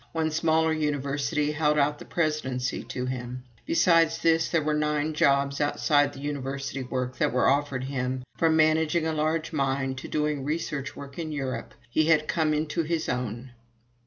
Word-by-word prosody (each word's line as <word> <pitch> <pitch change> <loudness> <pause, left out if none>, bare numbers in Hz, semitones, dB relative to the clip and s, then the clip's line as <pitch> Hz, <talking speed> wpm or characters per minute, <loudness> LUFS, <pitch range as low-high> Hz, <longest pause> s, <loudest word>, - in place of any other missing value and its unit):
One 160 -1 0
smaller 160 0 +2
university 145 -1 -1
held 150 0 +1
out 145 0 +2
the - - -10
presidency 140 -6 -1
to 125 - -4
him. 125 0 -5 0.2
Besides 165 -1 +4
this, 165 0 +2
there 165 -3 +1
were 155 +1 0
nine 150 0 0
jobs 140 -1 +2
outside 145 0 +2
of 140 - -12
University 140 -1 -3
work 125 0 -3
that - - +2
were 125 +1 +2
offered 140 -2 +1
him, 130 -1 -2
from 165 -1 +3
managing 160 +1 +3
a 160 - 0
large 155 +1 -1
mine 135 -2 0
to 130 - -6
doing 150 -2 -1
research 145 -2 -3
work 140 +2 -9
in 160 -2 -4
Europe. 130 -5 -4
He 155 +6 +1
had 155 -1 +3
come 160 -3 +1
into 155 +3 0
his 165 0 -2
own. 125 +1 -3
150 Hz, 170 wpm, -27 LUFS, 135-155 Hz, 0.2 s, Besides